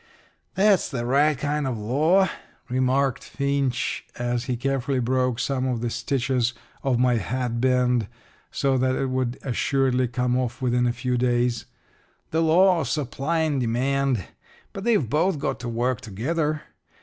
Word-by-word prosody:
"That's 195 0 +3
the 120 -4 -3
right 145 +4 +3
kind 145 +1 -1
of 125 -3 -2
a - - -7
law," 155 - +3 0.4
remarked 130 +1 +1
Finch, 140 -3 -1
as 120 0 -1
he 125 -1 -2
carefully 135 +1 -1
broke 125 0 +1
some 130 0 -1
of 120 -3 -1
the 120 -1 -2
stitches 130 -2 0 0.3
of 130 -3 +1
my 125 -1 +3
hatband 125 0 +1 0.4
so 135 -2 +1
that 130 0 +1
it 135 -1 -1
would 130 -1 -1
assuredly 130 0 +1
come 125 +1 0
off 120 -2 -3
within 125 -1 +1
a - - +2
few 125 0 -2
days 120 -1 +1 0.6
"the 160 - +1
law 175 +3 +5
of 140 - -3
supply 150 +3 -1
and 150 -4 0
demand. 130 -1 0 0.5
But 195 - -6
they've 215 - +2
both 160 - +1
got 135 -2 -2
to 120 -1 -5
work 120 +1 -1
together. 150 - -2
130 Hz, 155 wpm, -24 LUFS, 120-140 Hz, 0.6 s, law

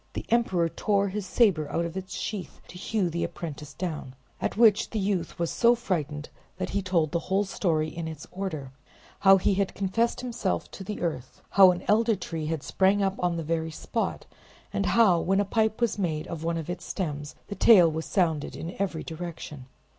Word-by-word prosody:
The - - -5
emperor 190 -8 +2
tore 200 +3 0
his 200 0 -4
saber 175 -12 +3
out 170 - 0
of 170 +1 -6
its 190 0 -5
sheath 205 -4 -5
to 180 - -10
hew 205 -1 0
the 170 0 -2
apprentice 150 -3 -6
down, 155 -7 -5 0.3
at - - -2
which 220 -3 +5
the 225 - -4
youth 190 -4 -1
was 170 -1 -1
so 240 0 +4
frightened 155 - -3 0.3
that - - -3
he 200 - 0
told 170 -5 +1
the 170 - +1
whole 195 +2 +3
story 165 -5 0
in 165 0 -5
its 155 -2 -7
order: 165 -8 -4 0.5
how 195 -1 +7
he 195 +2 +2
had 195 0 -1
confessed 215 +6 0
himself 240 - -2
to 195 - -8
the 210 +2 -5
earth; 155 -7 -4
how 195 -2 +8
an 180 0 -1
elder 225 +1 +4
tree 165 -4 -5
had 160 -3 -2
sprang 195 +1 +2
up 195 -1 +1
on 175 -1 0
the 165 - -3
very 160 +1 -1
spot; 155 - -3 0.5
and 100 - 0
how, 205 -7 +5
when 195 +3 +1
a 205 - +2
pipe 220 +1 +1
was 235 -3 0
made 160 -5 -1
of 165 -1 -6
one 165 0 0
of 160 - -5
its 175 +1 -5
sterns, 150 -6 -4
the - - -6
tale 185 -6 +6
was 160 +1 -4
sounded 165 -6 0
in 170 +2 -6
every 180 -5 -1
direction. 160 -5 -7
180 Hz, 205 wpm, -27 LUFS, 160-200 Hz, 0.5 s, how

